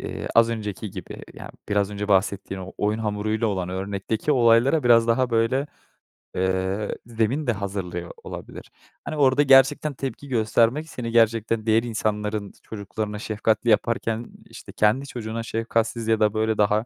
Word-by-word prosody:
eee, - - -5
az 115 0 +5
önceki 105 -2 -4
gibi 95 -3 -9
ya, - - -9 0.2
biraz 100 0 +1
önce 105 0 -4
bahsettiğin 95 0 0
o 95 +1 -8
oyun 105 +2 0
hamuruyla 110 +1 -1
olan 95 -4 -2
örnekteki 100 +8 -2
olaylara 125 +4 +4
biraz 115 -1 +5
daha, 125 +1 +2
böyle, 115 +5 +1 0.7
eee, 95 +2 -1
zemin 120 +5 -1
de - - +4
hazırlıyor 95 -4 -5
olabilir. - - -9 0.3
Hani, 155 - -4
orada 140 0 +4
gerçekten 135 +2 +5
tepki 135 +2 -6
göstermek 120 +5 +1
seni 115 -5 -5
gerçekten 115 -1 +2
diğer 110 +1 +3
insanların 105 -2 -2
çocuklarına 105 0 -5
şefkatli 110 +1 0
yaparken, 115 +1 +1 0.2
işte, - - -11
kendi 120 +7 +1
çocuğuna 115 -2 -5
şefkatsiz 115 0 -1
ya 110 -1 +2
da, 105 0 +3
böyle, 110 0 0
daha 105 +2 +2
110 Hz, 150 wpm, -24 LUFS, 105-115 Hz, 0.7 s, az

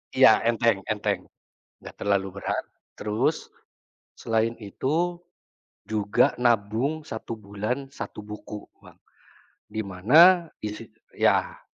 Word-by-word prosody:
Iya - - +7
enteng 115 -3 +2
enteng, 105 -1 -1 0.5
gak - - -11
terlalu 100 -1 0
berat, - - -2 0.3
terus 110 +9 -1 0.7
selain 115 +1 0
itu 165 - -2 0.6
juga 105 -2 +2
nabung 120 +6 0
1 110 0 -6
bulan, 105 +7 -4
1 115 -5 -8
buku 105 0 -8 0.2
Bang, - - -17 0.7
di 110 +1 -4
mana 155 - +5 0.2
isi 105 +2 -5 0.2
ya. - - +1
110 Hz, 100 wpm, -26 LUFS, 105-135 Hz, 0.7 s, Iya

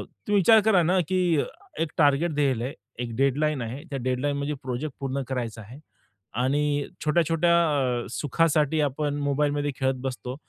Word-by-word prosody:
तुम्ही 205 - -5
विचार 215 +3 +6
करा 195 -6 +4
ना, 180 +3 +2
की 185 - +1 0.6
एक 165 - +1
टार्गेट 150 +3 +3
दिलं 135 -5 +1
आहे, 135 - -4 0.3
एक 115 -1 -6
डेडलाईन 140 +1 +1
आहे. 120 +5 -6
त्या 140 - -3
डेडलाईन 130 +3 -1
म्हणजे 145 +1 -2
प्रोजेक्ट 130 +3 -4
पूर्ण 135 0 -2
करायचा 115 -4 -3
आहे 120 +7 -12 0.7
आणि 145 +1 +1 0.2
छोट्या-छोट्या 165 +2 +2 0.5
अ, - - -8
सुखासाठी 155 +2 +1
आपण 145 +1 -1
मोबाईलमध्ये 145 0 0
खेळत 130 0 +1
बसतो. 125 -1 -4
145 Hz, 155 wpm, -26 LUFS, 130-155 Hz, 0.7 s, विचार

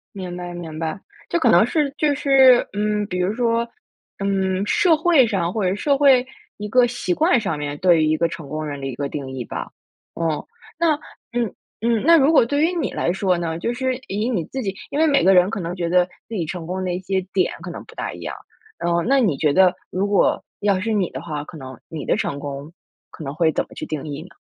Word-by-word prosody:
明 180 -2 -6
白 175 0 -6
明 165 -3 -7
白， 165 +4 -3 0.3
这 170 - 0
可 - - +3
能 175 +6 +6
是， 290 +2 0
就 300 -2 +2
是， 270 -3 +5
嗯， 210 0 0
比 180 -2 -4
如 180 +3 0
说， 235 0 0 0.5
嗯， 190 -1 0
社 340 - +4
会 315 -4 +4
上 190 -6 -1
或 215 +1 -2
者 185 - +2
是 - - -1
社 280 +6 +1
会 270 -3 +5 0.3
一 210 0 -5
个 250 +2 +5
习 235 -6 -2
惯 320 -5 +3
上 165 -7 -2
面 145 0 -4
对 175 -4 +4
于 - - +2
一 155 - +2
个 170 +1 +1
成 160 -3 -8
功 155 +2 -4
人 145 -1 -5
的 135 - -6
一 130 - -4
个 140 0 -3
定 135 -3 -5
义 130 -2 -4
吧。 - - -6 0.4
哦， 165 -3 -2 0.3
那， 335 -2 +4 0.4
嗯 240 -3 -1 0.3
嗯。 230 -1 +1
那 335 0 +7
如 295 0 +5
果 280 -7 +5
对 285 +4 0
于 335 +3 +3
你 340 - -2
来 170 - 0
说 185 -1 +1
呢， 165 -1 -2
就 235 +8 -2
是 260 0 -1
以 210 +5 -1
你 185 -10 -1
自 265 - -5
己 195 -3 -3 0.2
因 290 - -1
为 320 - +4
每 285 -2 +3
个 190 +1 +6
人 180 +1 +5
可 225 -2 -4
能 175 0 -4
觉 170 -2 -2
得 180 0 +4 0.2
自 230 - -6
己 170 -5 -1
成 165 0 -6
功 185 +1 -3
的 180 -1 -1
一 180 - -2
些 190 +1 -1
点 185 -2 +2
可 175 - -6
能 - - -8
不 450 - -16
大 - - -4
一 - - -10
样。 - - -5 0.4
然 170 0 -1
后 170 - +2
那 270 +10 +2
你 205 - +2
觉 150 - +2
得 185 +3 +5 0.2
如 190 +2 -1
果 200 -1 +2 0.2
要 200 -2 +2
是 225 +4 -2
你 195 -4 +1
的 - - -7
话， 150 -3 -4
可 160 - -11
能 130 -3 -10
你 155 -3 -6
的 - - +2
成 140 - -2
功， 140 +2 -6 0.4
可 155 - -10
能 140 0 -5
会 160 0 +2
怎 - - 0
么 - - -15
去 - - -8
定 150 -3 -4
义 145 +1 -5
呢？ 185 - -16
190 Hz, 275 characters per minute, -21 LUFS, 165-240 Hz, 0.5 s, 那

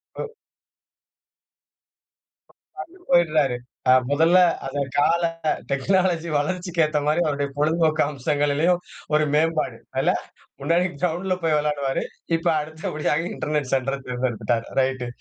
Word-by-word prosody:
ம். - - -4 2.5
அங்குட்டு 360 +1 -13
போய்டுறாரு. 155 - +3 0.3
அ - - +8 0.2
முதல்ல 165 +5 +4 0.3
அந்த 135 +1 -3 0.2
கால 165 +4 +3 0.5
டெக்னாலஜி 170 +3 +1
வளர்ச்சிக்கு 175 +2 0
ஏத்த 155 -1 0
மாரி 155 +3 +2
அவருடைய 145 -2 -1
பொழுதுபோக்கு 155 +1 +2
அம்சங்களிலும் 145 +4 +1 0.4
ஒரு 155 0 +3
மேம்பாடு. 160 +1 +1 0.2
இல்ல? - - +2 0.5
முன்னாடி 170 +5 +2 0.2
கிரவுண்ட்ல 180 +2 0
போய் 155 -2 +3
வெளையாடுவாரு. 145 -2 -1 0.3
இப்ப 165 - -4
அடுத்தபடியாக 155 +1 -2
இன்டர்நெட் 150 -3 -2
சென்டர 135 +1 0
தேர்ந்தெடுத்துட்டாரு. 125 -2 -1 0.2
ரைட்டு. 130 -1 -1
155 Hz, 105 wpm, -23 LUFS, 140-170 Hz, 2.5 s, அ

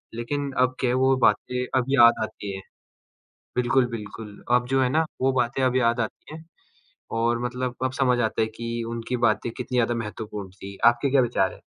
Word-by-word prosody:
लेकिन 140 +4 -3
अब 130 0 +2
क्या 125 - +1
है 125 - +1
वो 135 0 +4
बातें 125 0 +1 0.2
अब 125 - -1
याद 120 -4 +6
आती 100 -2 -6
हैं। 95 - -8 0.9
बिल्कुल, 125 +1 +3
बिल्कुल, 105 -1 -8
अब 125 0 0
जो 135 0 +2
है 125 - +2
ना, 160 +2 +2 0.2
वो 135 0 +3
बातें 120 +2 -1
अब 130 0 +1
याद 120 -1 +2
आती 115 +7 -5
हैं, 160 0 -10 0.7
और 115 +1 0
मतलब 125 0 -3
अब 130 - 0
समझ 125 -2 +3
आता 110 -1 0
है - - +2
कि 115 0 -4
उनकी 115 +2 -3
बातें 110 +2 -1
कितनी 125 0 -4
ज़्यादा 120 0 +2
महत्वपूर्ण 105 -3 -6
थी। 95 +1 -10
आपके 120 +3 +3
क्या 135 -1 +4
विचार 105 -6 +1
हैं? - - -18
120 Hz, 200 wpm, -25 LUFS, 115-130 Hz, 0.9 s, याद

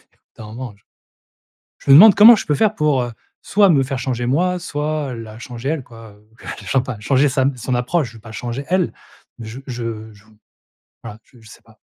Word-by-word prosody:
au - - -39
bout - - -52
d'un 110 - -10
moment 115 +1 -8
je 105 - -31 1.0
je - - -5
me - - +10
demande 205 +4 +9
comment 225 +3 +9
je - - -5
peux 150 - +1
faire 215 -1 +1
pour, 150 -7 +1
heu, 120 -1 -5 0.3
soit 200 -2 +3
me 140 -4 +3
faire 135 0 -4
changer 125 -2 -3
moi, 180 +7 0
soit, 150 -4 -4
heu, - - -7
la 110 0 -11
changer 120 +2 -7
elle, 155 -6 -3
quoi, 115 -3 -14
heu, 105 +1 -25 0.4
chan 135 -2 +1
pas 125 -5 -7
changer 135 +5 +2
sa 130 0 0
m 135 -1 0
son 125 +2 -3
approche, 130 +3 -1
je - - -18
vais 110 - -14
pas 110 +1 -12
changer 120 +4 -5
elle. 180 -1 0 0.5
Mais 115 - -9
je 125 +5 -9
je 115 -3 -6
je 105 0 -21 0.8
voilà 105 - -9
je 120 - -22
je 110 - -17
sais - - -16
pas. - - -23
130 Hz, 235 wpm, -19 LUFS, 115-150 Hz, 1.0 s, me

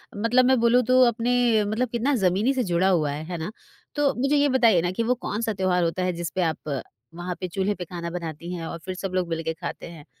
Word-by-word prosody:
मतलब 230 +4 +3
मैं 260 -1 +4
बोलूँ 235 +2 +4
तो 255 +2 +4
अपने 235 -1 +2
मतलब 225 +4 -1
कितना 240 +5 0
ज़मीनी 200 +9 +2
से 255 - 0
जुड़ा 180 -1 +2
हुआ 155 -6 +2
है, 150 +2 -5
है 175 +1 -5
ना? 160 +5 -5 0.4
तो 290 -2 +2
मुझे 275 +2 +2
ये 285 0 +3
बताइए 230 -9 +4
ना 175 - -1
कि 230 +5 -1
वो 250 +2 +1
कौन-सा 225 -1 -3
त्योहार 185 -2 +1
होता 170 +2 -1
है 180 - 0
जिस 170 -1 -4
पे 185 - +1
आप 155 -4 -2 0.4
वहाँ 175 +1 -4
पे 185 - -3
चूल्हे 195 +3 -1
पे 180 - -6
खाना 170 0 -6
बनाती 170 0 -6
हैं 165 -2 -5
और 170 - -6
फिर 185 -1 -4
सब 185 0 -5
लोग 180 -1 0
मिलकर 165 0 -2
खाते - - -5
हैं? 155 -4 -12
185 Hz, 245 wpm, -25 LUFS, 170-235 Hz, 0.4 s, मैं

